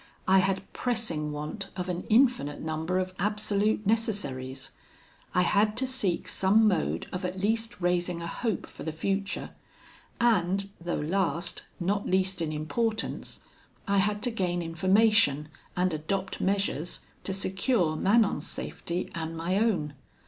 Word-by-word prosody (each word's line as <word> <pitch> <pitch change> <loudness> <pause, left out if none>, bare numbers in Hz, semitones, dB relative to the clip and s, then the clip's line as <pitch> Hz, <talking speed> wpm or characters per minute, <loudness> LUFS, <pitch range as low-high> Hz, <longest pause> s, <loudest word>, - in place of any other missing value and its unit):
I 190 +1 +6
had 190 0 +1
pressing 215 -12 -1
want 150 +7 -5
of 180 0 -2
an 180 -1 -3
infinite 220 - +3
number 160 +3 -1
of 185 0 -1
absolute 210 +1 +1
necessaries; 145 - -1 0.6
I 180 - +5
had 210 +3 +2
to 260 - +1
seek 215 -10 0
some 210 +3 +4
mode 80 - +1
of 180 +1 -3
at 180 +1 -3
least 225 +3 0
raising 175 0 +1
a 170 - -5
hope 220 +3 -2
for - - -13
the 160 - -3
future; 195 +5 -2 0.7
and, 195 -4 +2
though 175 0 -1
last, 170 +1 0
not 195 +3 0
least 190 -1 +1
in 160 -2 -1
importance, 215 +9 -2 0.5
I 200 0 +3
had 205 +1 +1
to 245 - +1
gain 180 -5 -1
information, 175 -3 +3 0.3
and 180 -1 +2
adopt 190 +5 -2
measures, 195 -4 0 0.2
to - - -1
secure 190 -2 +1
Manon's 205 +6 +3
safety 175 +2 -4
and 165 -1 -4
my 170 +3 0
own. 185 -10 +1
190 Hz, 140 wpm, -28 LUFS, 170-210 Hz, 0.7 s, I